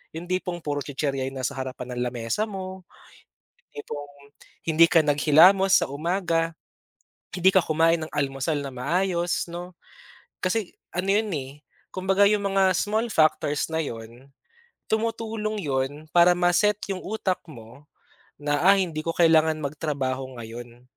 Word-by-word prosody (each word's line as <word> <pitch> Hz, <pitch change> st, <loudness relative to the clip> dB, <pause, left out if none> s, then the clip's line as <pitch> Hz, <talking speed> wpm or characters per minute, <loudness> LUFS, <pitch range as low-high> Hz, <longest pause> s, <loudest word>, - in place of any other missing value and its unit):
Yung 165 Hz, +2 st, -6 dB
tipong, 180 Hz, -1 st, -2 dB
puro 145 Hz, -2 st, -3 dB
chichirya 135 Hz, -1 st, -2 dB
yung 135 Hz, -, -10 dB
nasa 130 Hz, +1 st, -2 dB
harapan 130 Hz, -1 st, -5 dB
ng 120 Hz, -, -3 dB
lamesa 120 Hz, -, -2 dB
mo, 190 Hz, -1 st, -7 dB, 0.9 s
tipong, 145 Hz, -, -7 dB, 0.5 s
hindi 165 Hz, 0 st, +6 dB
ka 165 Hz, -, +5 dB
naghilamos 165 Hz, +7 st, +5 dB
sa -, -, -3 dB
umaga, 165 Hz, +2 st, -1 dB, 0.8 s
hindi 185 Hz, +1 st, +4 dB
ka 190 Hz, -, +5 dB
kumain 165 Hz, +1 st, +2 dB
ng -, -, -17 dB
almusal 140 Hz, +2 st, -1 dB
na 140 Hz, -, -5 dB
maayos, 175 Hz, +5 st, -1 dB
'no? 175 Hz, +1 st, -7 dB, 0.7 s
Kasi, 185 Hz, +1 st, -1 dB, 0.2 s
ano 185 Hz, +2 st, -2 dB
'yon, 215 Hz, 0 st, +1 dB
eh, 135 Hz, -3 st, -4 dB, 0.4 s
kumbaga 190 Hz, +2 st, +2 dB
yung 205 Hz, -1 st, +1 dB
mga 190 Hz, -1 st, +4 dB
small 220 Hz, +5 st, 0 dB
factors 155 Hz, -2 st, +2 dB
na 160 Hz, -, 0 dB
'yon, 120 Hz, +1 st, -9 dB, 0.6 s
tumutulong 220 Hz, -1 st, -2 dB
'yon, 145 Hz, 0 st, -2 dB
para 175 Hz, +1 st, +6 dB
ma-set 180 Hz, +4 st, +2 dB
yung 185 Hz, -, -5 dB
utak 195 Hz, -3 st, -2 dB
mo, 120 Hz, 0 st, -13 dB, 0.6 s
na, 145 Hz, 0 st, 0 dB
"Ah, 195 Hz, +1 st, +7 dB
hindi 170 Hz, -5 st, -1 dB
ko 165 Hz, +1 st, -3 dB
kailangan 160 Hz, -2 st, +4 dB
magtrabaho 135 Hz, -3 st, -3 dB
ngayon". 120 Hz, +1 st, -10 dB
165 Hz, 140 wpm, -25 LUFS, 140-190 Hz, 0.9 s, Ah